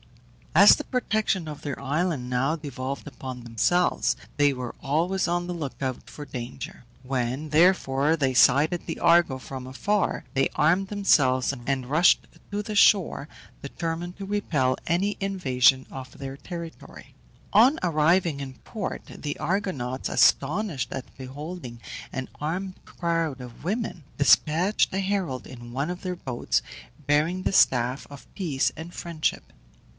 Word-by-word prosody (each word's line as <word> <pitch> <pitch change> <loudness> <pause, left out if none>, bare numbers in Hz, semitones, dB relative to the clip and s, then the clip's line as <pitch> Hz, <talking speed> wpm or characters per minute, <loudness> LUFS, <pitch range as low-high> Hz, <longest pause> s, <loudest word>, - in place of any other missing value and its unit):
As 200 +4 +9
the 295 - -5
protection 215 - -1
of 150 -1 -7
their 145 -3 -5
island 150 -3 -1
now 130 +5 +1
devolved 140 -2 -5
upon 130 -3 -7
themselves 120 +10 +1 0.2
they 145 -1 +4
were 125 -3 -5
always 170 +7 0
on 175 0 0
the 180 - -4
look 150 -6 -6
out 130 -2 -4
for 145 - -8
danger. 125 -1 -7 0.2
When, 130 +3 -2
therefore, 155 -2 +3
they 135 -3 +1
sighted 145 +7 +4
the 165 - -5
Argo 170 -5 +4
from 130 0 -8
afar 200 +10 -1
they 135 -1 +2
armed 180 +6 +3
themselves 140 -11 +3
and 130 -2 -1
rushed 160 +5 +4 0.2
to 205 +1 -2
the 215 +1 -5
shore, 195 -7 +4 0.3
determined 165 +4 -4
to 195 - -6
repel 155 -11 0
any 195 +5 +1
invasion 130 -10 +3
of 130 -2 -9
their 135 -1 -6
territory. 170 +3 -9 0.4
On 245 +8 +6
arriving 165 -1 +2
in 135 -2 -6
port 210 -4 -5
the 145 -1 -6
Argonauts, 150 -9 -2
astonished 155 0 +2
at 130 - -7
beholding 135 -1 -8 0.3
an 130 -1 -4
armed 185 +5 -4
crowd 165 -5 -2
of 125 0 -11
women, 200 -2 -3
despatched 160 +8 +3
a 190 - 0
herald 190 -9 -2
in 120 -2 -10
one 140 +7 -2
of 180 - -7
their 180 -1 -3
boats, 130 -7 -1 0.4
bearing 155 +6 +1
the - - 0
staff 125 -4 +3
of 140 -2 -12
peace 155 -9 0
and 165 +3 -8
friendship. 170 -3 -3
155 Hz, 145 wpm, -26 LUFS, 130-180 Hz, 0.4 s, As